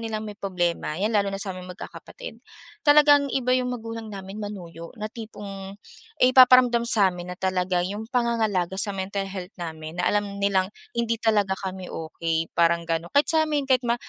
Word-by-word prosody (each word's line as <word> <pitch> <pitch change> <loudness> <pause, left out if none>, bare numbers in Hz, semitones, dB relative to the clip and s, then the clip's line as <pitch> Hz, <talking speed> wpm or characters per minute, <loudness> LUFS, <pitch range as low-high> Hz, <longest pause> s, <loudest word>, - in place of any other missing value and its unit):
nilang 220 -1 -4
may 210 - -7
problema 175 -4 -2
'yan 215 +3 0
lalo 200 -1 +2
na 195 - -4
saming 190 -2 -4
magkakapatid, - - -10 0.4
talagang 290 -1 +6
iba 255 -1 +1
'yung 250 -1 0
magulang 225 -2 -6
namin 195 +1 -8
manuyo 170 -5 -8
na 215 - -3
tipong, 200 -4 -8 0.5
ay 255 +1 +5
ipaparamdam 250 -2 +7
samin 185 -6 +1
na - - -9
talaga 185 -1 0
'yung 205 +4 -4
pangangalaga 220 -7 0
sa 205 - +1
mental 195 +1 -3
health 185 0 -7
namin 160 -1 -7
na - - 0
alam 205 -1 -1
nilang 190 -2 +2 0.3
hindi 235 -1 0
talaga 205 -4 +2
kami 190 -1 -6
okey 165 0 -3
parang 170 0 +3
ganun 165 +1 -2
kahit 285 +1 +4
samin 310 -2 +2
kahit 260 -2 +3
ma 235 - +3
200 Hz, 170 wpm, -25 LUFS, 180-235 Hz, 0.5 s, ipaparamdam